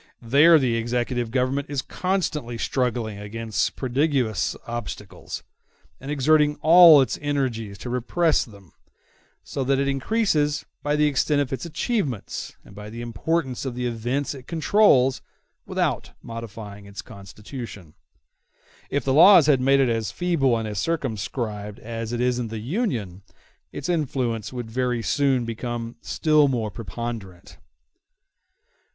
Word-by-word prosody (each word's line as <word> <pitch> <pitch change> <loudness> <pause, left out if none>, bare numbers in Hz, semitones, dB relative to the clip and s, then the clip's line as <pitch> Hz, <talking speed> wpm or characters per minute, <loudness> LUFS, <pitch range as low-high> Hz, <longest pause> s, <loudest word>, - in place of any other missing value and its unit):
There 145 +8 +6
the 125 -5 +1
executive 120 +1 -1
government 130 +3 -1
is 140 -2 -2
constantly 160 -10 -2
struggling 120 -4 -1
against 110 0 -2
prodigious 130 - 0
obstacles, 120 -3 -6 0.6
and 135 - -9
exerting 150 +1 +3
all 165 -2 +9
its 120 -7 -1
energies 125 -8 -2
to 125 - -7
repress 150 +7 +1
them; 100 -6 -16 0.7
so 135 - -3
that 135 +1 +2
it 140 0 0
increases 150 - +1 0.2
by 145 0 0
the 150 0 +3
extent 145 +1 +2
of 140 -2 -1
its 130 +5 -4
achievements, 155 - -3
and - - -15
by 105 +1 -9
the 115 +2 -7
importance 130 +4 -2
of 130 -3 -4
the 125 0 -3
events 120 +5 -2
it 130 -3 -12
controls, 160 -6 +3 0.5
without - - -1
modifying 105 -3 -8
its 100 0 -8
constitution. 100 - -10 1.0
If 140 - -1
the 135 - +2
laws 170 +2 +8
had 140 -4 +4
made 135 +1 +4
it 135 -2 +3
as 115 -2 -1
feeble 155 -9 +1
and 110 -1 -3
as 105 -2 -3
circumscribed 110 - -3
as 115 0 -6
it 120 - -2
is 125 0 +1
in 120 - -2
the 110 0 -6
Union, 115 - -3 0.5
its - - -6
influence 130 - -1
would 120 -3 -6
very 125 -1 -1
soon 135 -3 +1
become 115 0 -5
still 155 -2 +3
more 115 -5 -1
preponderant. 100 -2 -7
125 Hz, 140 wpm, -24 LUFS, 115-145 Hz, 1.0 s, all